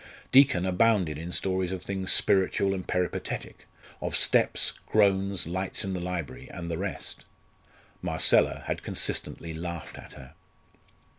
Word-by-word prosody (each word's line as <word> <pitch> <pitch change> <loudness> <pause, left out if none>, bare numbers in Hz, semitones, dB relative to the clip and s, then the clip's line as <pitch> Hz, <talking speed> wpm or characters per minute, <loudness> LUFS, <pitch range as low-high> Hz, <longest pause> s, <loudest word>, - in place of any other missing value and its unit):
Deacon 130 -9 +6
abounded 95 -5 +2
in 85 +2 -6
stories 95 0 0
of 95 -1 -5
things 95 -1 -2
spiritual 95 0 +3
and 95 -1 -5
peripatetic, 90 -1 -3 0.3
of - - -2
steps, - - +2
groans, 100 -2 +2
lights 95 +3 -2
in 95 - -3
the 90 - -2
library, 90 -4 -5
and 85 -1 -6
the 80 - -2
rest. 95 -1 -4 0.8
Marcella - - +3
had - - -3
consistently 80 -1 -2
laughed 85 +1 -6
at - - -12
her. - - -13
95 Hz, 135 wpm, -28 LUFS, 85-95 Hz, 0.8 s, Deacon